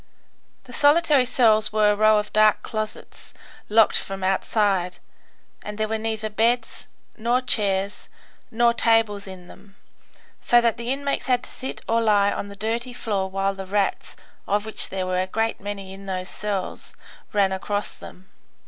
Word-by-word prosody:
The 250 Hz, -, -13 dB
solitary 290 Hz, -1 st, +4 dB
cells 225 Hz, -4 st, +3 dB
were 215 Hz, -1 st, +3 dB
a -, -, +1 dB
row 215 Hz, +1 st, +4 dB
of 210 Hz, 0 st, -3 dB
dark 215 Hz, 0 st, +4 dB
closets, 215 Hz, -1 st, -6 dB, 0.3 s
locked 220 Hz, 0 st, +4 dB
from 195 Hz, -1 st, -6 dB
outside, 190 Hz, -1 st, 0 dB, 0.6 s
and 210 Hz, 0 st, -7 dB
there 215 Hz, 0 st, 0 dB
were 220 Hz, 0 st, -2 dB
neither 220 Hz, -1 st, -3 dB
beds, 225 Hz, +2 st, 0 dB, 0.3 s
nor 235 Hz, +3 st, +1 dB
chairs, 200 Hz, -5 st, -1 dB, 0.4 s
nor 235 Hz, +1 st, +3 dB
tables 225 Hz, -4 st, +2 dB
in 185 Hz, -2 st, -10 dB
them, 195 Hz, +1 st, -16 dB, 0.6 s
so 240 Hz, -, +5 dB
that 235 Hz, -1 st, +1 dB
the 235 Hz, +1 st, -3 dB
inmates 280 Hz, +1 st, -2 dB
had 250 Hz, -1 st, +2 dB
to -, -, -9 dB
sit 265 Hz, -, -6 dB
or 230 Hz, 0 st, +2 dB
lie 205 Hz, -2 st, +3 dB
on -, -, -4 dB
the 200 Hz, -, -10 dB
dirty 230 Hz, +4 st, -3 dB
floor, 200 Hz, -5 st, -2 dB
while 195 Hz, +1 st, -1 dB
the 195 Hz, -1 st, -8 dB
rats, 200 Hz, 0 st, -1 dB, 0.3 s
of 205 Hz, +1 st, 0 dB
which 220 Hz, -, 0 dB
there 190 Hz, -1 st, -3 dB
were 185 Hz, 0 st, 0 dB
a 185 Hz, -, -2 dB
great 225 Hz, +3 st, -2 dB
many 200 Hz, -1 st, -6 dB
in 195 Hz, 0 st, -11 dB
those 185 Hz, -1 st, -4 dB
cells, 205 Hz, -3 st, -4 dB, 0.4 s
ran 200 Hz, -3 st, +2 dB
across 205 Hz, +2 st, -3 dB
them. 185 Hz, +1 st, -13 dB
210 Hz, 165 wpm, -23 LUFS, 195-230 Hz, 0.6 s, so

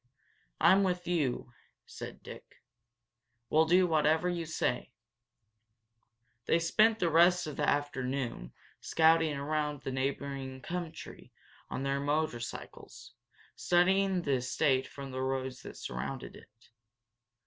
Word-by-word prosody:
"I'm 190 Hz, +3 st, +6 dB
with 180 Hz, -2 st, 0 dB
you," 145 Hz, -8 st, -1 dB, 0.3 s
said -, -, -9 dB
Dick. -, -, -12 dB, 0.9 s
"We'll 160 Hz, +1 st, +5 dB
do 180 Hz, +3 st, +4 dB
whatever 160 Hz, +1 st, +2 dB
you 170 Hz, -2 st, -2 dB
say." 160 Hz, -, -2 dB, 1.5 s
They -, -, +4 dB
spent 215 Hz, +7 st, +3 dB
the 175 Hz, -5 st, 0 dB
rest 175 Hz, +2 st, +5 dB
of 150 Hz, -, -6 dB
the 150 Hz, -, +1 dB
afternoon 130 Hz, -, -2 dB, 0.3 s
scouting 160 Hz, -1 st, +3 dB
around 150 Hz, 0 st, -2 dB
the -, -, -3 dB
neighboring 135 Hz, 0 st, -3 dB
country 175 Hz, -2 st, -7 dB, 0.4 s
on 135 Hz, -, -4 dB
their 140 Hz, 0 st, 0 dB
motorcycles, 145 Hz, -4 st, -4 dB, 0.4 s
studying 185 Hz, +1 st, +2 dB
the 140 Hz, -4 st, +1 dB
estate 130 Hz, +1 st, +1 dB
from 140 Hz, -1 st, -9 dB
the 130 Hz, 0 st, -4 dB
roads 130 Hz, -1 st, -3 dB
that -, -, -10 dB
surrounded 120 Hz, -, -5 dB
it. 115 Hz, -, -18 dB
150 Hz, 115 wpm, -31 LUFS, 135-170 Hz, 1.5 s, I'm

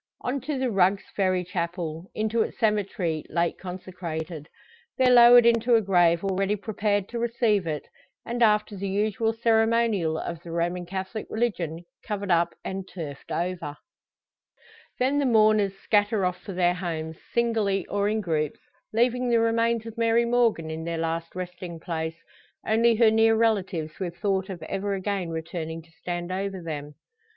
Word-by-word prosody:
On 260 Hz, +2 st, -2 dB
to 285 Hz, +2 st, -3 dB
the 260 Hz, -2 st, 0 dB
Rugg's 195 Hz, 0 st, +3 dB
Ferry 185 Hz, -2 st, +1 dB
chapel, 170 Hz, -1 st, -4 dB
into 220 Hz, +1 st, 0 dB
its -, -, -2 dB
cemetery, 200 Hz, -7 st, 0 dB
late 170 Hz, 0 st, 0 dB
consecrated. 175 Hz, -4 st, -6 dB, 0.5 s
There 255 Hz, -1 st, +5 dB
lowered 240 Hz, 0 st, +9 dB
into 235 Hz, +1 st, +4 dB
a 225 Hz, -, +4 dB
grave 175 Hz, -3 st, +3 dB
already 195 Hz, +1 st, 0 dB
prepared 205 Hz, -1 st, -1 dB
to 235 Hz, -, -4 dB
receive 230 Hz, -5 st, +1 dB
it; 150 Hz, -2 st, -3 dB, 0.4 s
and, 240 Hz, +1 st, -3 dB
after 210 Hz, -2 st, +3 dB
the 195 Hz, 0 st, -4 dB
usual 215 Hz, +3 st, 0 dB
ceremonial 225 Hz, -6 st, +2 dB
of 170 Hz, 0 st, -5 dB
the 175 Hz, -, -11 dB
Roman 175 Hz, +1 st, -2 dB
Catholic 190 Hz, +3 st, -5 dB
religion 175 Hz, -8 st, -2 dB, 0.2 s
covered 200 Hz, -3 st, -3 dB
up, 170 Hz, 0 st, +2 dB
and 190 Hz, 0 st, -4 dB
turfed 150 Hz, -7 st, -8 dB
over. 170 Hz, -4 st, -3 dB, 1.2 s
Then 265 Hz, +3 st, +2 dB
the 285 Hz, -, +1 dB
mourners 215 Hz, -4 st, +4 dB
scatter 205 Hz, -2 st, +2 dB
off 180 Hz, 0 st, -2 dB
for 195 Hz, -, -7 dB
their 175 Hz, -1 st, +2 dB
homes, 160 Hz, -3 st, -4 dB
singly 220 Hz, -5 st, +1 dB
or 205 Hz, 0 st, 0 dB
in 215 Hz, 0 st, 0 dB
groups, 155 Hz, -5 st, -1 dB, 0.3 s
leaving 245 Hz, +2 st, +1 dB
the 235 Hz, -1 st, +4 dB
remains 230 Hz, 0 st, +1 dB
of 225 Hz, 0 st, -8 dB
Mary 230 Hz, +1 st, +3 dB
Morgan 230 Hz, -9 st, +1 dB
in 160 Hz, +1 st, -5 dB
their 170 Hz, 0 st, -3 dB
last 165 Hz, +1 st, -3 dB
resting 180 Hz, -2 st, -6 dB
place, 160 Hz, -1 st, -4 dB, 0.5 s
only 230 Hz, +1 st, +3 dB
her 220 Hz, -1 st, +5 dB
near 225 Hz, 0 st, +4 dB
relatives 195 Hz, -8 st, 0 dB
with 175 Hz, -3 st, -4 dB
thought 195 Hz, -2 st, 0 dB
of 175 Hz, -4 st, -6 dB
ever 195 Hz, +4 st, -2 dB
again 195 Hz, -2 st, -2 dB
returning 160 Hz, 0 st, -5 dB
to 165 Hz, -, -24 dB
stand 175 Hz, +1 st, -5 dB
over 195 Hz, 0 st, -3 dB
them. 150 Hz, -3 st, -6 dB
195 Hz, 160 wpm, -26 LUFS, 170-225 Hz, 1.2 s, lowered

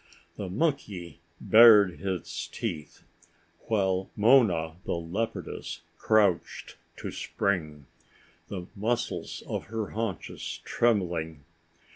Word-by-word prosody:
The 100 Hz, -3 st, -5 dB
monkey 100 Hz, -, -2 dB, 0.2 s
bared 110 Hz, -5 st, +7 dB
its 85 Hz, -3 st, -4 dB
teeth, 85 Hz, -5 st, -6 dB, 0.6 s
while 95 Hz, -3 st, 0 dB
Mona, 100 Hz, -9 st, +4 dB
the -, -, -2 dB
leopardess, 95 Hz, +8 st, -4 dB, 0.2 s
crouched 105 Hz, -5 st, +1 dB, 0.2 s
to -, -, -5 dB
spring, 75 Hz, -8 st, -2 dB, 0.6 s
the 90 Hz, -3 st, -6 dB
muscles 115 Hz, +4 st, -2 dB
of -, -, -4 dB
her 110 Hz, -2 st, -4 dB
haunches 110 Hz, -7 st, -4 dB
trembling. 85 Hz, -10 st, 0 dB
95 Hz, 90 wpm, -28 LUFS, 85-110 Hz, 0.6 s, bared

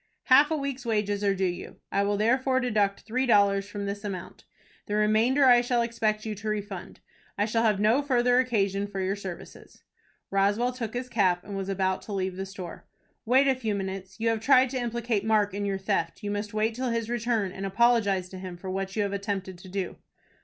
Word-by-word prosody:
"Half 280 Hz, +3 st, +6 dB
a 315 Hz, -, 0 dB
week's 275 Hz, -3 st, -4 dB
wages 210 Hz, -3 st, -1 dB
are 200 Hz, -1 st, +2 dB
due 190 Hz, 0 st, 0 dB
you, 175 Hz, -1 st, -4 dB, 0.2 s
I 200 Hz, -, +2 dB
will 200 Hz, 0 st, +1 dB
therefore 260 Hz, +4 st, +2 dB
deduct 210 Hz, -6 st, 0 dB
three 255 Hz, +4 st, -1 dB
dollars 200 Hz, -3 st, +3 dB
from 205 Hz, -1 st, -5 dB
this 200 Hz, +1 st, -4 dB
amount. 195 Hz, -4 st, -7 dB, 0.4 s
The 210 Hz, -, -2 dB
remainder 220 Hz, +6 st, +3 dB
I 245 Hz, -2 st, +7 dB
shall 240 Hz, -1 st, +1 dB
expect 225 Hz, -2 st, -1 dB
you 220 Hz, -, -2 dB
to 210 Hz, +1 st, -5 dB
refund. 205 Hz, -3 st, -5 dB, 0.4 s
I 205 Hz, -, +2 dB
shall 225 Hz, +1 st, 0 dB
have 215 Hz, -3 st, +2 dB
no 220 Hz, +7 st, +3 dB
further 250 Hz, -3 st, +3 dB
occasion 200 Hz, -5 st, 0 dB
for 200 Hz, -1 st, -6 dB
your 190 Hz, +1 st, 0 dB
services." 190 Hz, -4 st, -10 dB, 0.5 s
Roswell 205 Hz, +5 st, +2 dB
took 235 Hz, -2 st, -5 dB
his 250 Hz, +1 st, -3 dB
cap, 185 Hz, -7 st, +1 dB
and 200 Hz, -, -7 dB
was 195 Hz, 0 st, -4 dB
about 190 Hz, -1 st, 0 dB
to 210 Hz, -, -7 dB
leave 190 Hz, -1 st, -2 dB
the 190 Hz, +1 st, -5 dB
store. 185 Hz, -3 st, -9 dB, 0.4 s
"Wait 265 Hz, +3 st, +5 dB
a 270 Hz, -, +5 dB
few 225 Hz, -5 st, -2 dB
minutes. 195 Hz, 0 st, -5 dB
You 230 Hz, +1 st, +1 dB
have 225 Hz, -1 st, 0 dB
tried 255 Hz, +2 st, +4 dB
to 260 Hz, -, -2 dB
implicate 235 Hz, -3 st, -1 dB
Mark 210 Hz, -2 st, +2 dB
in 205 Hz, +1 st, -2 dB
your 195 Hz, -1 st, -1 dB
theft. 195 Hz, +3 st, -2 dB
You 205 Hz, -, -2 dB
must 205 Hz, +1 st, -3 dB
wait 215 Hz, +1 st, 0 dB
till 255 Hz, +2 st, -2 dB
his 230 Hz, -1 st, -1 dB
return, 230 Hz, -4 st, -1 dB
and 195 Hz, +1 st, -7 dB
apologize 200 Hz, -2 st, +2 dB
to 185 Hz, -, -9 dB
him 185 Hz, -2 st, -7 dB
for 185 Hz, +1 st, -6 dB
what 195 Hz, 0 st, -3 dB
you 210 Hz, -, +1 dB
have 200 Hz, 0 st, -2 dB
attempted 200 Hz, -2 st, -3 dB
to 185 Hz, -, -12 dB
do." 190 Hz, -1 st, -4 dB
210 Hz, 215 wpm, -27 LUFS, 195-235 Hz, 0.5 s, I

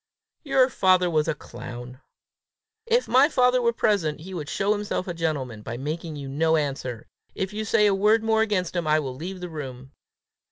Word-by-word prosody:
"Your 270 Hz, -3 st, +3 dB
father 185 Hz, -7 st, +3 dB
was 155 Hz, -1 st, +1 dB
a 160 Hz, -, 0 dB
clown!" 125 Hz, 0 st, -9 dB, 0.9 s
"If 475 Hz, +1 st, +2 dB
my 265 Hz, +5 st, +5 dB
father 250 Hz, -3 st, +3 dB
were 235 Hz, -1 st, +3 dB
present, 185 Hz, -10 st, 0 dB
he 190 Hz, +3 st, -9 dB
would 155 Hz, -4 st, -5 dB
show 200 Hz, +4 st, +1 dB
himself 205 Hz, -3 st, -3 dB
a 175 Hz, -, -3 dB
gentleman 145 Hz, -9 st, -3 dB
by 115 Hz, +2 st, -6 dB
making 155 Hz, +4 st, -4 dB
you 140 Hz, -2 st, -6 dB
no 160 Hz, +4 st, +2 dB
answer. 135 Hz, -6 st, -3 dB, 0.3 s
If 190 Hz, +1 st, -3 dB
you 215 Hz, +1 st, -3 dB
say 210 Hz, -1 st, +3 dB
a 205 Hz, -, +4 dB
word 210 Hz, +3 st, +3 dB
more 220 Hz, 0 st, +2 dB
against 195 Hz, -5 st, 0 dB
him, 170 Hz, -3 st, -1 dB
I 155 Hz, 0 st, +4 dB
will 135 Hz, -4 st, -4 dB
leave 180 Hz, +6 st, -6 dB
the 180 Hz, -, -5 dB
room." 135 Hz, -4 st, -8 dB
170 Hz, 195 wpm, -25 LUFS, 145-210 Hz, 0.9 s, my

